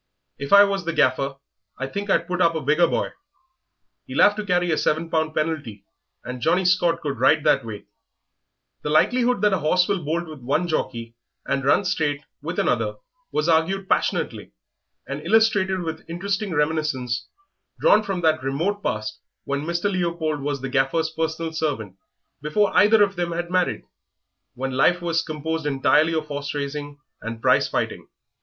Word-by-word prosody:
If 140 Hz, 0 st, -5 dB
I 200 Hz, 0 st, +9 dB
was 200 Hz, -2 st, -1 dB
the 170 Hz, 0 st, -2 dB
Gaffer 135 Hz, -1 st, +1 dB, 0.4 s
I 135 Hz, -, -3 dB
think 200 Hz, +8 st, -5 dB
I'd -, -, +2 dB
put 180 Hz, 0 st, -2 dB
up 165 Hz, -1 st, +3 dB
a 160 Hz, -, -2 dB
bigger 155 Hz, +5 st, +3 dB
boy. -, -, -1 dB, 1.0 s
He'll -, -, +2 dB
'ave 205 Hz, 0 st, +5 dB
to 215 Hz, -, -3 dB
carry 180 Hz, -2 st, +2 dB
a 155 Hz, -, +1 dB
seven 165 Hz, +2 st, 0 dB
pound 160 Hz, -1 st, 0 dB
penalty, 150 Hz, -10 st, -3 dB, 0.4 s
and 125 Hz, 0 st, -7 dB
Johnnie 180 Hz, +7 st, +2 dB
Scott 175 Hz, -2 st, +2 dB
could 140 Hz, -4 st, -4 dB
ride 150 Hz, +4 st, +4 dB
that 135 Hz, -, +3 dB
weight." 110 Hz, -3 st, -8 dB, 1.0 s
The -, -, -4 dB
likelihood 245 Hz, +7 st, +2 dB
that 210 Hz, -1 st, +4 dB
a 190 Hz, -, +1 dB
horse 180 Hz, +4 st, +2 dB
will 195 Hz, -4 st, -1 dB
bolt 165 Hz, +3 st, -2 dB
with 155 Hz, -2 st, -9 dB
one 140 Hz, +8 st, 0 dB
jockey 115 Hz, -7 st, -3 dB, 0.3 s
and 140 Hz, 0 st, -1 dB
run 145 Hz, +9 st, +3 dB
straight 150 Hz, -5 st, -1 dB, 0.2 s
with -, -, -5 dB
another -, -, 0 dB, 0.4 s
was 150 Hz, -, 0 dB
argued 175 Hz, +4 st, +1 dB
passionately, -, -, -1 dB, 0.5 s
and 140 Hz, +2 st, -5 dB
illustrated 195 Hz, -1 st, +2 dB
with 160 Hz, -1 st, -5 dB
interesting 195 Hz, +4 st, -2 dB
reminiscences 145 Hz, -5 st, -1 dB, 0.5 s
drawn -, -, +5 dB
from 190 Hz, -3 st, -3 dB
that 155 Hz, -3 st, +2 dB
remote 165 Hz, +10 st, -1 dB
past 110 Hz, -, -3 dB, 0.2 s
when 140 Hz, 0 st, -2 dB
Mr. 170 Hz, +1 st, -2 dB
Leopold 170 Hz, -6 st, -1 dB
was 140 Hz, -1 st, -3 dB
the 135 Hz, -, -4 dB
Gaffer's 140 Hz, +4 st, +1 dB
private 160 Hz, 0 st, -3 dB
servant 130 Hz, -12 st, -3 dB, 0.5 s
before 190 Hz, +8 st, +1 dB
either 210 Hz, +1 st, +6 dB
of 200 Hz, -2 st, -1 dB
them 175 Hz, -1 st, -1 dB
had 175 Hz, +1 st, -4 dB
married 185 Hz, -1 st, 0 dB, 0.7 s
when 135 Hz, +1 st, -3 dB
life 175 Hz, +7 st, +3 dB
was 170 Hz, -1 st, 0 dB
composed 160 Hz, 0 st, -4 dB
entirely 150 Hz, +3 st, +3 dB
of 155 Hz, -1 st, -1 dB
horse 145 Hz, -1 st, -5 dB
racing 145 Hz, 0 st, -4 dB, 0.2 s
and 115 Hz, 0 st, -6 dB
prize -, -, +3 dB
fighting. -, -, -3 dB
160 Hz, 170 wpm, -23 LUFS, 140-180 Hz, 1.0 s, I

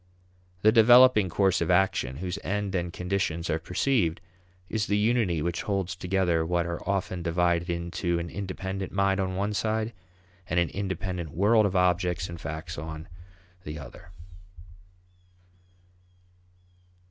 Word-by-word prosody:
The 110 Hz, -, +7 dB
developing 120 Hz, -2 st, +7 dB
course 95 Hz, +2 st, +2 dB
of 85 Hz, -, 0 dB
action, 90 Hz, -8 st, +2 dB
whose 90 Hz, +3 st, -4 dB
end 100 Hz, 0 st, -2 dB
and 90 Hz, -2 st, -1 dB
conditions 90 Hz, -2 st, -2 dB
are 80 Hz, -, 0 dB
perceived, 90 Hz, 0 st, 0 dB, 0.5 s
is 110 Hz, +1 st, -2 dB
the 105 Hz, -, +1 dB
unity 105 Hz, -7 st, +1 dB
which 85 Hz, +1 st, -2 dB
holds 95 Hz, -3 st, -2 dB
together 90 Hz, -2 st, +1 dB
what 85 Hz, +1 st, 0 dB
are 85 Hz, -1 st, -4 dB
often 95 Hz, -2 st, -1 dB
divided 85 Hz, 0 st, +1 dB
into 85 Hz, 0 st, -2 dB
an 85 Hz, 0 st, -3 dB
independent 95 Hz, 0 st, -5 dB
mind 100 Hz, 0 st, +1 dB
on 95 Hz, -1 st, -1 dB
one 100 Hz, +2 st, -1 dB
side 110 Hz, +2 st, -1 dB, 0.5 s
and 85 Hz, -, +1 dB
an 85 Hz, -, +1 dB
independent 95 Hz, -3 st, -4 dB
world 105 Hz, +7 st, +3 dB
of 95 Hz, -, -4 dB
objects 90 Hz, -2 st, +1 dB
and 85 Hz, -1 st, -8 dB
facts 80 Hz, +1 st, -6 dB
on 80 Hz, +1 st, -7 dB, 0.5 s
the 75 Hz, +1 st, -6 dB
other. 75 Hz, +4 st, -11 dB
90 Hz, 135 wpm, -27 LUFS, 85-100 Hz, 0.5 s, The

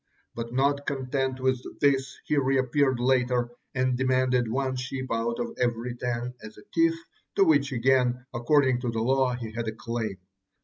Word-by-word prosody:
But 115 Hz, 0 st, -5 dB
not 140 Hz, +2 st, +1 dB
content 130 Hz, -1 st, -1 dB
with 130 Hz, -1 st, +1 dB, 0.2 s
this, 135 Hz, -1 st, +2 dB
he 150 Hz, -, 0 dB
reappeared 135 Hz, -1 st, +2 dB
later 125 Hz, -1 st, +2 dB, 0.2 s
and 130 Hz, -1 st, +1 dB
demanded 130 Hz, -2 st, +2 dB
one 130 Hz, +2 st, -1 dB
sheep 130 Hz, +1 st, -4 dB
out 115 Hz, +1 st, 0 dB
of 120 Hz, -, -3 dB
every 120 Hz, 0 st, 0 dB
ten 120 Hz, 0 st, -3 dB
as 110 Hz, 0 st, -11 dB
a 105 Hz, -, -13 dB
tithe, 165 Hz, 0 st, +3 dB, 0.4 s
to 195 Hz, -, +5 dB
which 145 Hz, -5 st, +3 dB
again, 125 Hz, 0 st, +2 dB
according 130 Hz, +1 st, +2 dB
to 125 Hz, -, -1 dB
the 115 Hz, -, -3 dB
law, 130 Hz, 0 st, +2 dB
he 115 Hz, -3 st, -6 dB
had 115 Hz, 0 st, -4 dB
a 110 Hz, -, -2 dB
claim. 115 Hz, -3 st, -3 dB
130 Hz, 170 wpm, -27 LUFS, 120-135 Hz, 0.4 s, to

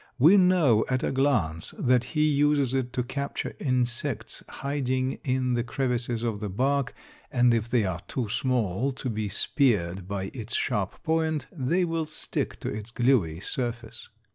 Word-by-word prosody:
We 155 Hz, +10 st, +7 dB
know 180 Hz, -, +5 dB
at 130 Hz, -1 st, 0 dB
a -, -, 0 dB
glance 115 Hz, -, 0 dB
that 125 Hz, -1 st, +3 dB
he 150 Hz, 0 st, +4 dB
uses 145 Hz, -3 st, +2 dB
it 130 Hz, -2 st, -1 dB
to 125 Hz, -, 0 dB
capture 140 Hz, +3 st, -4 dB
insects 125 Hz, -3 st, -1 dB
hiding 130 Hz, -2 st, -2 dB
in 130 Hz, -1 st, 0 dB
the 120 Hz, -1 st, +1 dB
crevices 120 Hz, -2 st, -1 dB
of 110 Hz, -3 st, -1 dB
the 105 Hz, -1 st, -4 dB
bark, 135 Hz, +7 st, 0 dB, 0.4 s
and 125 Hz, -2 st, +4 dB
if 115 Hz, 0 st, 0 dB
they 120 Hz, -4 st, +2 dB
are 90 Hz, -2 st, -2 dB
too 125 Hz, -4 st, -2 dB
small 125 Hz, +1 st, 0 dB
to 130 Hz, 0 st, -4 dB
be 105 Hz, -1 st, -2 dB
speared 95 Hz, -, +1 dB
by 95 Hz, -1 st, -3 dB
its 120 Hz, -2 st, -5 dB
sharp 105 Hz, -6 st, -1 dB
point, 160 Hz, -3 st, 0 dB
they 170 Hz, +4 st, +1 dB
will 165 Hz, -1 st, -1 dB
stick 155 Hz, -, -4 dB
to -, -, -4 dB
its 105 Hz, +1 st, -6 dB
gluey 115 Hz, -10 st, +2 dB
surface. 120 Hz, -2 st, -4 dB
125 Hz, 165 wpm, -27 LUFS, 110-140 Hz, 0.4 s, We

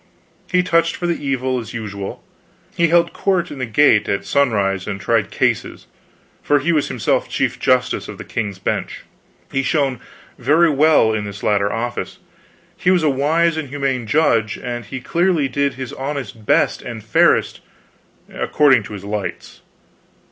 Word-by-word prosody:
He 180 Hz, -1 st, +3 dB
touched 170 Hz, -1 st, +2 dB
for 175 Hz, -, -4 dB
the 170 Hz, -3 st, -2 dB
evil, 130 Hz, -2 st, -1 dB
as 115 Hz, -2 st, -8 dB
usual; 100 Hz, -3 st, -6 dB, 0.5 s
he 170 Hz, -, +3 dB
held 170 Hz, +1 st, +3 dB
court 190 Hz, -3 st, 0 dB
in 145 Hz, -, -8 dB
the 130 Hz, -, -2 dB
gate 115 Hz, -2 st, +4 dB
at 100 Hz, -, -1 dB
sunrise 100 Hz, -9 st, +1 dB
and 100 Hz, -2 st, -4 dB
tried -, -, +1 dB
cases, -, -, -1 dB, 0.6 s
for 145 Hz, -, +2 dB
he 145 Hz, +5 st, 0 dB
was 150 Hz, -3 st, +1 dB
himself -, -, -1 dB
Chief -, -, -1 dB
Justice -, -, +1 dB
of -, -, -8 dB
the -, -, -8 dB
King's 100 Hz, -3 st, -4 dB
Bench. -, -, -3 dB, 0.5 s
He 135 Hz, -, +1 dB
shone 135 Hz, -3 st, 0 dB, 0.4 s
very 155 Hz, +5 st, +4 dB
well 145 Hz, -6 st, +4 dB
in 105 Hz, -1 st, -2 dB
this 100 Hz, 0 st, -8 dB
latter 100 Hz, -1 st, +1 dB
office. 120 Hz, +3 st, -4 dB, 0.6 s
He 180 Hz, -, 0 dB
was 180 Hz, -3 st, +3 dB
a 150 Hz, -, +3 dB
wise 160 Hz, +5 st, +1 dB
and 155 Hz, -4 st, -4 dB
humane 135 Hz, -4 st, -2 dB
judge, 115 Hz, -7 st, +2 dB
and 120 Hz, -2 st, -5 dB
he 130 Hz, +5 st, -7 dB
clearly 170 Hz, 0 st, +1 dB
did 140 Hz, +2 st, -1 dB
his 130 Hz, -2 st, -6 dB
honest 135 Hz, -6 st, -6 dB
best -, -, +2 dB
and 115 Hz, -3 st, -7 dB
fairest, 110 Hz, -, +2 dB, 0.7 s
according 135 Hz, -5 st, +3 dB
to 105 Hz, -, -9 dB
his 100 Hz, -2 st, -8 dB
lights. 100 Hz, -1 st, -5 dB
130 Hz, 165 wpm, -19 LUFS, 110-155 Hz, 0.7 s, gate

